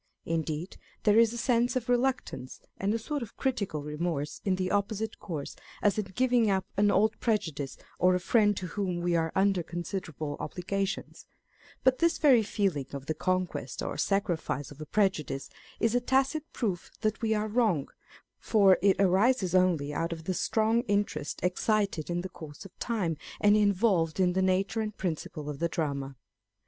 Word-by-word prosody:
Indeed 160 +1 -3 0.3
there 210 +1 +5
is 230 -1 +5
a 235 - -5
sense 245 +1 +2
of 250 -3 -1
reluctance 245 - -1 0.2
and 195 +1 0
a 225 - +1
sort 290 +5 -3
of 235 - -8
critical 200 - -1
remorse 150 -1 -3
in 190 -2 +1
the 185 0 -2
opposite 205 +2 -1
course 155 -7 -5 0.2
as 205 +1 +2
in 210 - -1
giving 245 -3 +3
up 190 -1 +1
an 205 +1 +3
old 215 +2 +2
prejudice 160 - -1 0.2
or 180 0 +4
a - - +1
friend 205 +1 +3
to 185 - -3
whom 180 -1 -2
we 175 0 +1
are 165 -1 +1
under 195 -1 +3
considerable 165 -3 -5
obligations; 195 +2 -3 0.6
but 260 0 +4
this 335 0 +3
very 270 -6 +6
feeling 195 - -1
of 140 -1 -6
the 155 - -1
conquest 180 -7 -2
or - - -3
sacrifice 175 -8 -1
of 145 +1 -11
a 155 - -7
prejudice 155 -10 0 0.3
is 225 0 +2
a 245 - +2
tacit 270 +5 +1
proof 190 -7 -2
that 215 0 0
we 220 -1 +1
are 210 0 0
wrong; 210 - +1 0.5
for 200 -4 +4
it 195 -1 +3
arises 195 +1 +3
only 175 -6 +2
out 165 +3 -1
of 165 -1 -5
the 185 - -1
strong 220 +5 +2
interest 200 -8 -1
excited 195 -2 0
in 175 0 -1
the 185 - -6
course 155 -1 -10
of 195 - -13
time, 190 -10 -1 0.2
and 205 0 +5
involved 195 -5 +2
in 180 -1 +3
the 190 - +1
nature 190 +4 +1
and 215 -1 -4
principle 155 -4 -4
of 145 -2 -5
the 170 - 0
drama. 140 -4 -3
190 Hz, 180 wpm, -29 LUFS, 165-220 Hz, 0.6 s, very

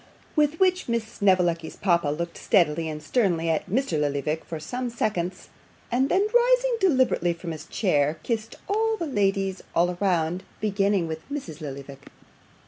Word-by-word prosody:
With 300 0 +2
which 370 -5 +2
Miss 235 -1 +1
Snevellicci's 180 -6 +1
papa 170 -5 +2
looked 170 +3 -3
steadily 165 -5 +2
and 150 0 -6
sternly 170 -5 +1
at 160 +3 -2
Mr. 210 - 0
Lillyvick 145 +2 -1
for 160 - -6
some 245 +10 -4
seconds, 195 -6 -2 0.4
and 260 +3 +2
then 390 +2 +3
rising - - +4
deliberately 260 - +3
from 170 0 -6
his 155 - -8
chair, 150 -6 +1
kissed 225 -2 -3
the 440 -2 0
ladies 195 -7 0
all 175 +1 +2
round, 180 -2 +1 0.2
beginning 200 -3 +1
with 160 0 -5
Mrs. 175 - -5
Lillyvick. 140 -1 -8
185 Hz, 145 wpm, -25 LUFS, 160-250 Hz, 0.4 s, rising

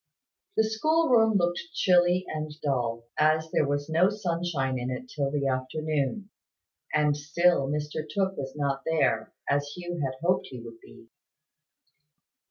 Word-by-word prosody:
The - - +5
school 315 +9 +2
room 225 -4 +5
looked 175 -1 0
chilly 180 0 +4
and 155 0 -4
dull, 120 -5 -1 0.2
as 155 +1 +3
there 145 - +2
was 145 0 -1
no 165 +4 +4
sunshine 170 -10 -2
in 125 +1 -3
it 190 - -5
till 140 -2 0
the 140 -1 -1
afternoon; 150 +8 -2 0.6
and 150 -1 +2
still 150 0 +2
Mr 150 +1 -2
Tooke 190 +1 0
was 135 -3 -5
not 140 -2 -1
there, 150 -9 +1 0.2
as 145 0 0
Hugh 175 -2 -5
had 130 -1 -2
hoped 180 +2 +2
he 125 - -8
would 115 -1 -11
be. - - -16
155 Hz, 150 wpm, -27 LUFS, 140-175 Hz, 0.6 s, The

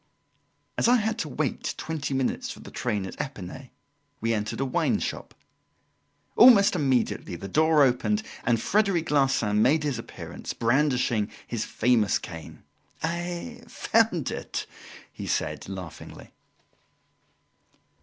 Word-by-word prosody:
As - - +3
I 245 - +6
had 220 -2 0
to 155 - -2
wait 145 +1 -2
twenty 155 -4 -3
minutes 130 -1 -1
for - - -7
the - - -11
train 105 -5 -2
at 95 - -5
Epinay, 130 0 -7 0.5
we 115 +1 0
entered 105 -1 -2
a 135 - +1
wine 130 - +1
shop. - - -5 1.0
Almost 210 -5 +7
immediately 135 - 0
the 95 - -7
door 155 +6 +4
opened 140 - +1 0.2
and 120 -2 +2
Frederic 195 - +1
Larsan 135 -7 +2
made 150 +6 +4
his 140 -6 -1
appearance, - - -7
brandishing 120 -4 +1 0.2
his 115 -2 -3
famous 115 -3 +2
cane. 80 -2 -10 0.4
"I 175 +7 -3
found 220 - +1
it!" - - -4 0.5
he - - -7
said - - -2
laughingly. 95 -4 -9
135 Hz, 125 wpm, -26 LUFS, 115-170 Hz, 1.0 s, Almost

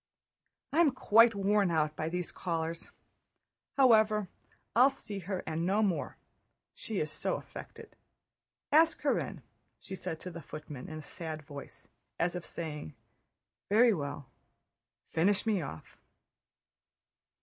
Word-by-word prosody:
"I'm 325 0 +6
quite 230 -2 +6
worn 200 0 +3
out 155 -2 +1
by 155 - -2
these 180 0 -3
callers. 165 -1 -3 0.9
However, 215 -6 +5 0.5
I'll 250 +4 +7
see 210 -7 -6
her 185 0 -4
and 160 +1 -2
no 200 +5 +2
more. 190 -5 -1 0.6
She 215 -4 -4
is 155 0 -1
so - - -1
affected. - - -10 0.8
Ask 320 +2 +5
her - - +2
in," - - -6 0.4
she - - -9
said 160 -3 -4
to 180 - -6
the 170 0 -8
footman 150 -5 -8
in 155 - -6
a - - -6
sad 155 -2 -6
voice, 140 -1 -10 0.3
as 175 +1 +1
if 175 - -5
saying: 150 -2 -6 0.7
"Very 225 +3 +6
well, 145 -4 -4 0.9
finish 195 +6 +2
me 210 -5 +2
off." 80 - -8
180 Hz, 130 wpm, -32 LUFS, 155-210 Hz, 0.9 s, I'll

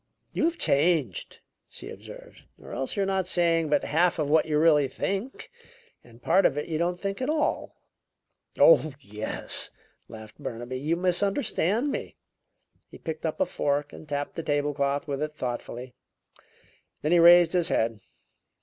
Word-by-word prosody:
"You - - +1
have 335 +1 0
changed," 145 - +1 0.3
she - - -10
observed, - - -13
"or - - -12
else 135 - -3
you're 200 - 0
not 190 -2 -1
saying 165 -3 +1
but 150 - +2
half 175 +3 +1
of 150 -2 -1
what 160 +1 +3
you 150 -1 +1
really 150 -3 +4
think 200 - -4 0.5
and 120 0 -19
part 185 +4 +3
of 140 - +2
it 150 - -3
you 160 -2 -2
don't 175 +1 -1
think 195 +4 -4
at 260 - -1
all." 305 -1 -1 0.8
"Oh, 155 - +5
yes," 105 -4 -1 0.4
laughed 110 -1 -12
Burnaby, 120 +2 -5
"you 155 +5 0
misunderstand 200 - 0
me." - - -5 0.7
He - - -12
picked 160 0 -5
up 155 - -4
a - - +3
fork 145 0 -2
and 155 - -12
tapped 145 0 -3
the 165 - -4
table 145 -1 -1
cloth 140 +1 -1
with 140 -1 -3
it 150 0 -3
thoughtfully; 125 -1 -5 1.1
then 150 - 0
he 175 - +5
raised 170 0 +7
his 175 -2 +2
head. 115 -1 0
155 Hz, 165 wpm, -26 LUFS, 140-180 Hz, 1.1 s, raised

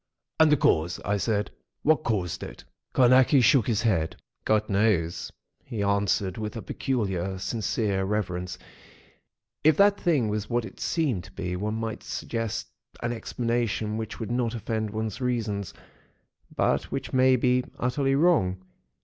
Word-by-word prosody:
"And 160 -1 +6
the 150 - +5
cause?" 85 -6 +2
I 105 +2 +1
said. 105 +1 -1 0.3
"What 155 0 +3
caused 95 -6 -1
it?" - - -8 0.3
Carnacki 130 +2 +5
shook 125 -2 +4
his 110 -2 +1
head. 80 -8 +1 0.3
"God 110 0 +2
knows," 95 -5 +1 0.3
he 110 -4 -4
answered, 100 -1 +1
with 105 +1 -4
a 110 - -6
peculiar 95 -8 -2
sincere 100 -1 -1
reverence. 90 -3 -2 1.1
"IF 155 -1 +5
that 200 0 +5
thing 150 - +2
was 105 0 -2
what 120 -1 0
it 95 - -11
seemed 135 - 0
to 95 - -13
be, 90 -1 -4
one 105 +4 -2
might 115 -1 -4
suggest 115 -2 -4 0.3
an 120 0 0
explanation, 115 -2 -1
which 110 -1 -5
would 110 -1 -4
not 120 -1 0
offend 110 -1 -2
one's 110 +2 -4
reason, 115 -5 -1 0.9
but - - +1
which - - -5
may 130 0 +5
be 125 0 +2
utterly 135 +2 +1
wrong. 140 - +3
110 Hz, 150 wpm, -26 LUFS, 100-125 Hz, 1.1 s, And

